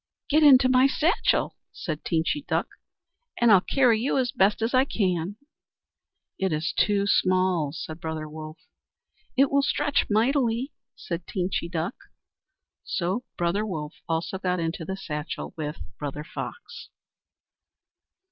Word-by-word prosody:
"Get 305 Hz, +2 st, +4 dB
into 265 Hz, -4 st, +7 dB
my 255 Hz, +1 st, +5 dB
satchel," 325 Hz, -, +1 dB
said 155 Hz, -3 st, -5 dB
Teenchy 165 Hz, -, 0 dB
Duck, -, -, 0 dB, 0.7 s
"and 235 Hz, -2 st, +5 dB
I'll 195 Hz, -3 st, +7 dB
carry 245 Hz, -1 st, +3 dB
you 270 Hz, +3 st, +1 dB
as 250 Hz, -2 st, +1 dB
best 205 Hz, -5 st, +2 dB
I 255 Hz, 0 st, +5 dB
can." 185 Hz, -, -1 dB, 1.0 s
"It 190 Hz, -2 st, 0 dB
is 155 Hz, +2 st, -1 dB
too 200 Hz, -1 st, +2 dB
small," 185 Hz, -6 st, +2 dB
said 160 Hz, +1 st, -7 dB
Brother 160 Hz, -1 st, -4 dB
Wolf. 155 Hz, +1 st, -8 dB, 0.8 s
"It 270 Hz, +1 st, +4 dB
will 280 Hz, 0 st, +4 dB
stretch 290 Hz, +1 st, +1 dB
mightily," 240 Hz, +3 st, +1 dB, 0.2 s
said 170 Hz, -5 st, -6 dB
Teenchy 180 Hz, -2 st, -2 dB
Duck. 170 Hz, +5 st, -2 dB, 0.9 s
So 190 Hz, +8 st, -2 dB
Brother 175 Hz, +4 st, 0 dB
Wolf 155 Hz, -7 st, -4 dB, 0.2 s
also 165 Hz, +3 st, -1 dB
got 180 Hz, -1 st, 0 dB
into 165 Hz, 0 st, -2 dB
the 190 Hz, +3 st, -4 dB
satchel 150 Hz, -4 st, -5 dB
with 155 Hz, -1 st, -4 dB, 0.2 s
Brother 145 Hz, 0 st, -4 dB
Fox. 480 Hz, -, -8 dB
190 Hz, 130 wpm, -26 LUFS, 165-250 Hz, 1.0 s, into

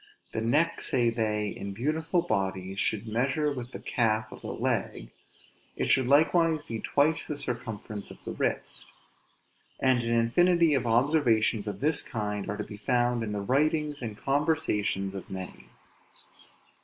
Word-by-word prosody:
The 110 Hz, -, -2 dB
neck, 150 Hz, +9 st, +2 dB
say 120 Hz, -2 st, +2 dB
they, 105 Hz, -2 st, -1 dB
in 100 Hz, 0 st, -6 dB
beautiful 160 Hz, -, 0 dB
bodies, 95 Hz, -, -2 dB
should 110 Hz, +1 st, 0 dB
measure 135 Hz, +7 st, 0 dB
with 125 Hz, -2 st, -6 dB
the -, -, -6 dB
calf 110 Hz, -2 st, 0 dB
of -, -, -11 dB
the -, -, -7 dB
leg; -, -, -2 dB, 0.6 s
it -, -, 0 dB
should 130 Hz, -2 st, +4 dB
likewise 160 Hz, +2 st, +4 dB
be 115 Hz, -4 st, -5 dB
twice 150 Hz, +7 st, +1 dB
the 150 Hz, -, -4 dB
circumference 110 Hz, -5 st, -5 dB
of -, -, -11 dB
the -, -, -4 dB
wrist. -, -, -3 dB, 0.9 s
And 130 Hz, -2 st, +3 dB
an 115 Hz, -, -3 dB
infinity 165 Hz, +9 st, +4 dB
of 130 Hz, -4 st, +1 dB
observations 115 Hz, -4 st, +2 dB
of 100 Hz, +1 st, -5 dB
this 150 Hz, +1 st, +3 dB
kind 105 Hz, -5 st, -4 dB
are 105 Hz, -, -3 dB
to 105 Hz, -, -3 dB
be 105 Hz, -, -9 dB
found 120 Hz, +2 st, +1 dB
in 110 Hz, -2 st, -3 dB
the 105 Hz, -1 st, -2 dB
writings 150 Hz, +5 st, +1 dB
and 110 Hz, -4 st, -5 dB
conversations 135 Hz, -, 0 dB
of 95 Hz, -, -8 dB
many. 95 Hz, -1 st, -7 dB
120 Hz, 155 wpm, -28 LUFS, 105-145 Hz, 0.9 s, should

